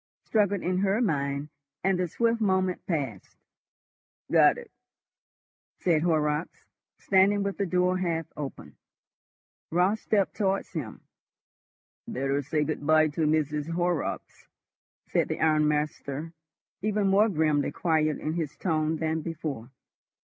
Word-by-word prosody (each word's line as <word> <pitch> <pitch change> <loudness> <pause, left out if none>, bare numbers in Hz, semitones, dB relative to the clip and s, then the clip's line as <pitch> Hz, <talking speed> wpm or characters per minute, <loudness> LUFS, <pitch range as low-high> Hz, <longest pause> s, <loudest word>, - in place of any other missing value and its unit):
struggled 205 -3 +1
in 180 +1 0
her 200 +2 +2
mind, 140 - -1 0.4
and 190 -1 +2
the 180 - +1
swift 230 +6 0
moment 185 -3 +1
passed. 135 - -3 0.9
"Got - - +6
it?" - - -11 1.1
said 165 -4 +2
Horrocks, 155 -1 0 0.3
standing 200 +1 +3
with 200 0 -3
the 200 - 0
door 180 +1 +1
half 165 -3 -1
open. 145 -2 -7 0.9
Raut 180 +6 +2
stepped 205 -3 0
towards 195 -2 -1
him. 145 -11 -6 1.1
"Better 135 +2 -1
say 150 +2 0
good 150 0 -3
bye 155 0 +5
to 155 +1 0
Mrs. 150 0 0
Horrocks," 175 -2 -2 0.6
said - - +1
the - - -3
ironmaster, 150 0 0 0.5
even 210 0 0
more 200 +3 +4
grimly 155 -5 +1
quiet 155 -3 +1
in 155 - -3
his 160 -4 -3
tone 155 -3 0
than 160 0 -1
before. 155 -7 -5
160 Hz, 125 wpm, -27 LUFS, 150-190 Hz, 1.1 s, Got